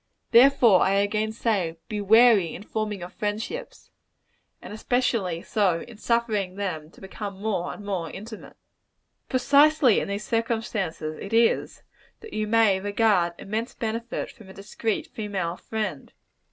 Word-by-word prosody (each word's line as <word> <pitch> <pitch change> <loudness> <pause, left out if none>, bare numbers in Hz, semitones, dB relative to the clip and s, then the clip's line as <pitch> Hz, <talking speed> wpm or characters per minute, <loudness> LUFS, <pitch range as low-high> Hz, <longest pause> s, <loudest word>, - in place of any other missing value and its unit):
Therefore, 240 -5 +6
I 190 - +3
again 210 +2 +1
say, 200 -8 -1
be 210 -3 -3
wary 220 -3 +5
in 200 - -9
forming 215 -3 -3
your 175 - -6
friendships 220 - -5 0.7
and - - -10
especially 215 -7 -1
so, 185 -6 +1
in 235 -3 -11
suffering 220 -6 0
them 180 -6 -4
to - - -19
become 195 0 -7
more 200 -4 -2
and 205 - -10
more 180 -5 -3
intimate. 215 +5 -10 0.7
Precisely 280 -1 +4
in - - -3
these 200 +1 -4
circumstances 220 -9 -2
is 200 - -7 0.5
it, - - -28 0.4
that 440 - -11
you 215 0 -2
may 215 -3 +3
derive 200 -3 +2
immense 220 +4 -4
benefit 230 +1 -4
from 220 -7 -16
a - - -11
discreet 210 +2 -3
female 195 -6 -4
friend. 210 -9 -5
210 Hz, 140 wpm, -25 LUFS, 190-230 Hz, 0.7 s, Therefore